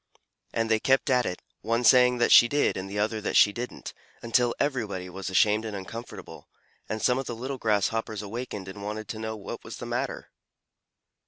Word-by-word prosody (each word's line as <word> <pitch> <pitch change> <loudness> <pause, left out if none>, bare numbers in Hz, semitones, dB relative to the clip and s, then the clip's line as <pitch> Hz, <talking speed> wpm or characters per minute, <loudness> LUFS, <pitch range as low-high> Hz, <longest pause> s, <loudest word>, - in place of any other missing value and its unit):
and 115 0 -1
they 110 - +4
kept 135 +3 +2
at 125 -1 +3
it, 90 - -5 0.2
one 115 +2 0
saying 125 +1 +6
that 120 - +2
she 120 - +9
did 145 +3 +1
and 95 +1 -5
the 100 - -5
other 110 +1 0
that - - -3
she 105 - +6
didn't, 120 +2 -6 0.3
until 120 +1 +2
everybody 110 -10 -2
was 95 +1 -5
ashamed 105 +3 +3
and 110 -2 -5
uncomfortable, 115 +5 -9 0.4
and 110 0 -3
some 125 +1 +3
of 135 - -5
the 120 - -4
little 130 +3 -5
Grasshoppers 110 0 0
awakened 105 -2 -6
and 95 +2 -8
wanted 105 +1 -5
to 110 - -6
know 110 0 -4
what 100 - -8
was - - -8
the - - -7
matter. - - -4
110 Hz, 195 wpm, -27 LUFS, 105-120 Hz, 0.4 s, she